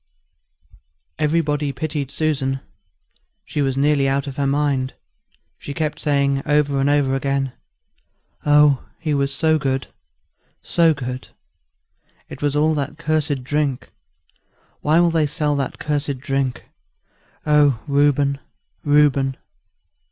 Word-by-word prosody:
Everybody 150 -2 +1
pitied 145 0 -3
Susan. 140 -3 -1 0.9
She 150 - -2
was 135 -1 0
nearly 140 -1 +3
out 135 +1 0
of 140 -2 -6
her 140 -1 +1
mind; 140 -2 0 0.6
she 140 - -7
kept 155 -2 -2
saying 140 -2 +1
over 145 -1 +1
and 140 - +2
over 145 -2 +2
again, 135 0 -1 0.9
"Oh! 145 -2 +5 0.2
he 155 -2 -1
was 140 -1 0
so 155 +2 +2
good 135 -1 -1 0.8
so 165 -2 +3
good! 130 -2 -5 1.0
It - - -9
was 145 -1 0
all 155 +2 +3
that 145 0 -3
cursed 155 -4 -1
drink; 145 -1 -1 0.9
why 155 +3 +3
will 175 -1 +4
they 160 -2 +2
sell 150 0 -1
that 135 -2 -3
cursed 145 -2 -2
drink? 135 -2 -2 0.8
Oh 145 -5 +4
Reuben, 140 -1 +2 0.4
Reuben!" 145 -3 +3
145 Hz, 120 wpm, -21 LUFS, 135-150 Hz, 1.0 s, Oh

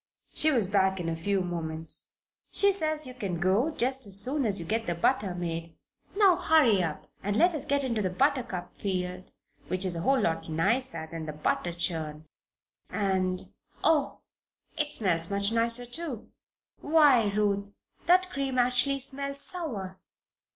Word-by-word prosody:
She 310 - +2
was 240 -9 +2
back 190 -1 +1
in 170 - -3
a 165 - -2
few 195 +4 0
moments. 165 -2 -2 0.4
"She 400 0 +5
says 310 -5 0
you 255 - -8
can 195 -9 -4
go, 195 - +2
just 265 -4 -1
as 195 0 +2
soon 265 +4 0
as 200 -1 0
you 170 - -6
get 225 +5 -1
the 175 - -1
butter 195 0 +1
made. 165 -2 -4 0.4
Now, 390 -4 +5
hurry 255 -12 +4
up, 160 -4 -3 0.2
and 205 +1 -1
let 350 +8 +4
us 305 - -5
get 280 0 +1
into 230 -5 -1
the 185 - 0
buttercup 240 -4 -1
field, 185 -1 -3 0.4
which 185 +1 -1
is 180 -2 -1
a - - -3
whole 270 +7 +3
lot 165 -4 -1
nicer 165 +1 0
than 165 -1 -6
the 155 - -4
butter 155 +3 -1
churn 160 -3 -4 0.6
and 185 -3 -1 0.3
Oh! 305 -3 +2 0.5
it 300 -1 +1
smells 170 - 0
much 200 +1 +1
nicer, 230 +1 +3
too. 250 -2 -5 0.5
Why, 285 -9 +4
Ruth, 200 -1 0 0.4
that 365 +1 +5
cream 270 -2 -2
actually 250 +3 +2
smells 275 +1 -3
sour!" 235 - -4
205 Hz, 165 wpm, -28 LUFS, 180-270 Hz, 0.6 s, She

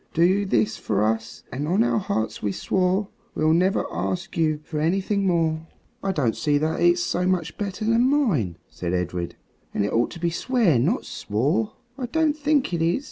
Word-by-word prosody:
Do 185 +5 +3
this 110 - +1
for 105 -1 0
us, 110 +1 -2
and 145 +4 -3
on 190 +7 +3
our 225 - +2
hearts 110 - -2
we 105 - 0
swore 185 - 0 0.3
We'll 155 +1 +3
never 185 +3 +2
ask 95 +2 -3
you 155 -2 +1
for 150 0 -4
anything 195 +5 +1
more." 165 -2 +1 0.3
"I 195 - 0
don't 135 -11 0
see 145 -1 +1
that 155 +2 0
it's 175 0 +4
so 180 +1 0
much 170 -3 0
better 205 +1 -4
than 230 +3 +3
mine," 170 - +1
said 90 0 -4
Edred, 90 -1 -3 0.4
"and 100 - +1
it - - -2
ought 115 +1 +2
to 170 - -9
be 170 0 0
swear, 210 - +2
not 175 - +1
swore." 150 - -1 0.3
"I 250 - -2
don't 315 +2 +1
think 295 - +1
it 170 - 0
is. 165 +6 +2
170 Hz, 190 wpm, -24 LUFS, 120-200 Hz, 0.4 s, it's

